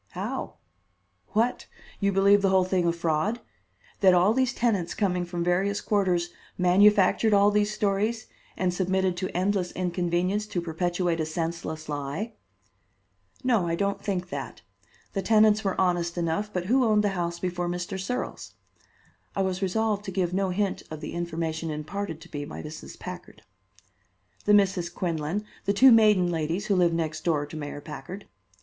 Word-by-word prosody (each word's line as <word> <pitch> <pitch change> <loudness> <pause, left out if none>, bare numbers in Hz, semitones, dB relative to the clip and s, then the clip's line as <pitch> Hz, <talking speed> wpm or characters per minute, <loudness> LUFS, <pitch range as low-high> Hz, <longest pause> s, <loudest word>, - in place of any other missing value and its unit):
"How? - - -4 0.8
What? 230 +4 +1 0.3
You 200 -1 +2
believe 200 +1 +5
the 195 - +3
whole 190 -1 +4
thing 180 -1 +1
a - - +4
fraud? 170 +6 -1 0.6
That 190 -2 +6
all 185 +5 +4
these 260 0 +2
tenants 210 -9 0
coming 180 -4 0
from 175 -1 -3
various 190 +3 +1
quarters 180 -4 0 0.3
manufactured 200 +3 +4
all 200 +1 +5
these 210 0 +2
stories 210 +2 0 0.3
and 180 -1 0
submitted 185 0 0
to 185 +1 -2
endless 185 -1 0
inconvenience 180 +3 -1
to 180 - -2
perpetuate 175 +1 -1
a 160 - 0
senseless 160 -1 -4
lie?" 145 +10 -4 1.1
"No, 230 -9 +2
I 165 - 0
don't 200 +2 -1
think 185 -3 -2
that. - - -6 0.5
The 195 - -1
tenants 215 +1 +4
were 195 -2 -1
honest 175 -2 +1
enough, 170 +5 -1
but 180 -3 -3
who 255 +6 +3
owned 215 -2 +3
the 205 - +2
house 170 -3 -2
before 175 -1 -2
Mr. 180 +2 -4
Searles?" 250 +7 -4 0.8
I 195 - +1
was 190 0 -2
resolved 210 +2 0
to 190 - -4
give 180 -2 -1
no 190 0 +1
hint 195 +1 -1
of 155 -1 -7
the 150 - -6
information 165 -1 -3
imparted 160 +3 -4
to - - -13
me 145 -1 -3
by 145 - -7
Mrs. 155 +1 -9
Packard. - - -9 1.0
"The 210 - +6
Misses 190 -4 +2
Quinlan, 170 +3 -2 0.2
the 200 - +2
two 260 +6 +7
maiden 210 -6 +5
ladies 165 +4 -2
who 200 - +1
live 175 -2 +4
next 160 -2 -2
door 155 -4 +1
to 145 - -10
Mayor 145 -1 -6
Packard." 180 +7 -8
185 Hz, 165 wpm, -26 LUFS, 170-205 Hz, 1.1 s, two